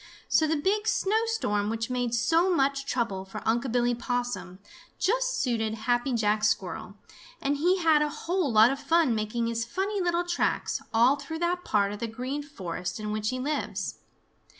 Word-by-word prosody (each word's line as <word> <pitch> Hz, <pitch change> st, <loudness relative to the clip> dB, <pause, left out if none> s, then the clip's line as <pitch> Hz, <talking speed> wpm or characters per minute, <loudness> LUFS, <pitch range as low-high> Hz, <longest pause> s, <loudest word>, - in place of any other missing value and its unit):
So 315 Hz, -, +3 dB
the 320 Hz, -, +1 dB
big 405 Hz, +8 st, 0 dB
snowstorm 430 Hz, -, +1 dB
which 225 Hz, +2 st, -3 dB
made 245 Hz, -2 st, 0 dB
so 325 Hz, +11 st, +3 dB
much 275 Hz, -3 st, +1 dB
trouble 230 Hz, -7 st, -1 dB
for 195 Hz, -, -8 dB
Unc' 235 Hz, +3 st, +1 dB
Billy 245 Hz, 0 st, +2 dB
Possum 240 Hz, -7 st, -3 dB, 0.4 s
just -, -, +1 dB
suited 225 Hz, -3 st, 0 dB
Happy 240 Hz, +4 st, 0 dB
Jack 215 Hz, -2 st, +1 dB
Squirrel, 200 Hz, -2 st, -1 dB, 0.4 s
and 285 Hz, +1 st, 0 dB
he 355 Hz, +6 st, +3 dB
had 320 Hz, -4 st, +4 dB
a 300 Hz, -, +1 dB
whole 340 Hz, 0 st, -1 dB
lot 220 Hz, +2 st, +6 dB
of 275 Hz, -, -3 dB
fun 325 Hz, -5 st, +3 dB
making 220 Hz, +2 st, -1 dB
his 230 Hz, 0 st, -1 dB
funny 385 Hz, -, -2 dB
little 345 Hz, -1 st, +1 dB
tracks 350 Hz, 0 st, -1 dB
all 240 Hz, +5 st, +4 dB
through 295 Hz, +3 st, -6 dB
that 350 Hz, +2 st, -1 dB
part 200 Hz, -1 st, +1 dB
of 205 Hz, -, -6 dB
the 230 Hz, -, -2 dB
Green 255 Hz, +6 st, -4 dB
Forest 185 Hz, -, -5 dB
in 210 Hz, 0 st, -4 dB
which 215 Hz, 0 st, -1 dB
he 255 Hz, -, -2 dB
lives. 290 Hz, +4 st, -3 dB
250 Hz, 175 wpm, -27 LUFS, 220-325 Hz, 0.4 s, lot